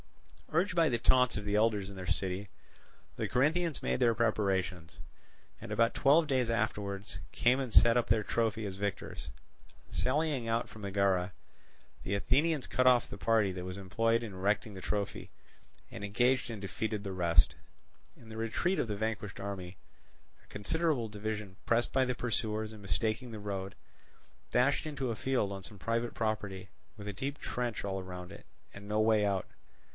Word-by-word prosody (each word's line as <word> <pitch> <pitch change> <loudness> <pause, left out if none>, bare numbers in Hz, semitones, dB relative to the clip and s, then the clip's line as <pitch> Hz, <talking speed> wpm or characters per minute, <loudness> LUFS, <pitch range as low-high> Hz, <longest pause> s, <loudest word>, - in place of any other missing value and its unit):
Urged 175 +5 +2
by 165 -2 +4
the 120 - +1
taunts 125 0 +4
of 105 - -5
the 105 0 0
elders 105 -2 +2
in 100 - -9
their 95 -1 -7
city, 95 +2 -1 0.7
the - - -1
Corinthians 155 +4 +1
made 65 0 0
their 115 -1 +4
preparations, 95 -7 0 0.6
and - - -8
about 115 0 +3
twelve 150 +4 +4
days 130 -4 +1
afterwards 105 -5 -2
came 125 +2 +3
and 130 -3 -3
set 115 +2 +7
up 120 - +2
their 110 0 +3
trophy 110 0 0
as 95 -2 -4
victors. 100 0 -4 0.6
Sallying 140 -3 0
out 115 +1 +1
from 110 - -12
Megara, 100 -2 +1 0.7
the 95 +2 -1
Athenians 145 +8 +2
cut 130 0 +2
off 125 -2 +5
the - - -7
party 110 -2 +3
that 90 -1 -5
was 90 +1 -5
employed 115 +5 +1
in 110 -4 -6
erecting 100 +3 0
the 95 - -8
trophy, 100 +1 -3 0.6
and 100 - -8
engaged 125 +5 +2
and 110 -4 -5
defeated 105 +2 -3
the 100 -2 -4
rest. 85 -2 +3 0.6
In 115 - -16
the 110 0 -8
retreat 115 - 0
of - - +1
the 105 - -2
vanquished 105 -2 -3
army, 95 -2 -5 0.7
a - - -26
considerable 135 +4 0
division, 105 -2 -4
pressed 120 0 +2
by 130 - +4
the 125 0 -1
pursuers 110 -2 -2
and 105 - -11
mistaking 110 +5 -1
the 110 - -6
road, 100 -2 -4 0.8
dashed 140 +5 +3
into 135 -5 -2
a - - -2
field 125 -4 0
on 95 -1 -7
some 105 0 -10
private 115 +3 -1
property, 100 -4 -2 0.3
with 105 -1 -8
a 105 - -3
deep 135 +8 -3
trench 120 -4 -3
all 95 -1 -2
round 90 0 -7
it, 105 - -12 0.3
and 100 +1 -10
no 105 +1 0
way 110 -1 +4
out. 100 -2 0
110 Hz, 175 wpm, -32 LUFS, 100-120 Hz, 0.8 s, set